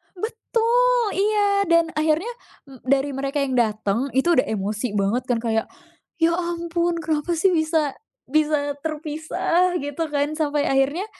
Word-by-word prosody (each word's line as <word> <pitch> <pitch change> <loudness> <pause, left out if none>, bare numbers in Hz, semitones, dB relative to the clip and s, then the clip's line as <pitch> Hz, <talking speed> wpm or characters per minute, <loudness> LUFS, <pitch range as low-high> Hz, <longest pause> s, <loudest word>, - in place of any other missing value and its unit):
Betul, 470 +3 +1
iya, 405 -2 +2
dan 335 -1 +3
akhirnya 315 +9 +1 0.4
m 260 - -13
dari 275 +1 +2
mereka 275 +1 -2
yang 265 -2 -2
dateng 220 +2 0
itu 305 +6 +3
udah 255 - +2
emosi 215 +3 -2
banget 205 +5 +1
kan 240 -2 +1
kayak, 225 -1 0 0.6
"Ya, 335 - +5
ampun 340 0 -1
kenapa 315 +2 -1
sih 370 +4 +3
bisa 315 -3 +1 0.3
bisa 295 0 +1
terpisah", 320 +3 -1
gitu 290 +3 -3
kan 295 +1 -1
sampai 295 -1 +1
akhirnya 275 +8 +1
310 Hz, 140 wpm, -23 LUFS, 270-345 Hz, 0.6 s, Ya